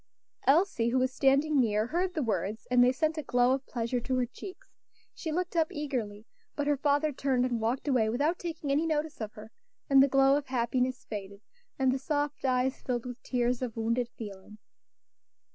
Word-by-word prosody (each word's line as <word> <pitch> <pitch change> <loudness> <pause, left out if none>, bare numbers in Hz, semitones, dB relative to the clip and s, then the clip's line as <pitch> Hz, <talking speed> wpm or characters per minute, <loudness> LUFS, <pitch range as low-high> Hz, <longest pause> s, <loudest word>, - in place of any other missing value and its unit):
Elsie, 275 -6 +3
who 250 - +1
was 255 0 +1
standing 280 +3 +3
near, 215 -3 +2
heard 355 +7 -1
the 310 - 0
words, 215 -1 -2
and 250 0 +6
they 250 - +5
sent 310 +4 -1
a - - -1
glow 245 -2 +2
of 265 0 -1
pleasure 235 +1 -2
to 260 +2 -2
her 255 -1 +1
cheeks. 365 +10 -11 0.5
She 320 - -5
looked 355 +2 -2
up 325 -1 +3
eagerly; 235 -8 -4 0.3
but 290 - -1
her 290 0 +2
father 290 +2 +2
turned 260 -2 0
and 240 -3 -1
walked 240 +6 -1
away 245 -6 +2
without 290 +9 0
taking 325 -4 -4
any 305 +4 +2
notice 310 -3 -2
of 215 -1 -5
her, 215 +1 -12 0.4
and 270 -1 +8
the 275 - +6
glow 270 0 +4
of 290 - -5
happiness 255 0 -1
faded, 200 -1 -7 0.4
and 265 -1 +3
the 265 - -1
soft 290 +1 -2
eyes 255 0 +1
filled 245 -2 -2
with 245 -1 -7
tears 245 -1 0
of 240 -3 -4
wounded 230 +2 0
feeling. 205 -1 -9
260 Hz, 195 wpm, -29 LUFS, 235-290 Hz, 0.5 s, and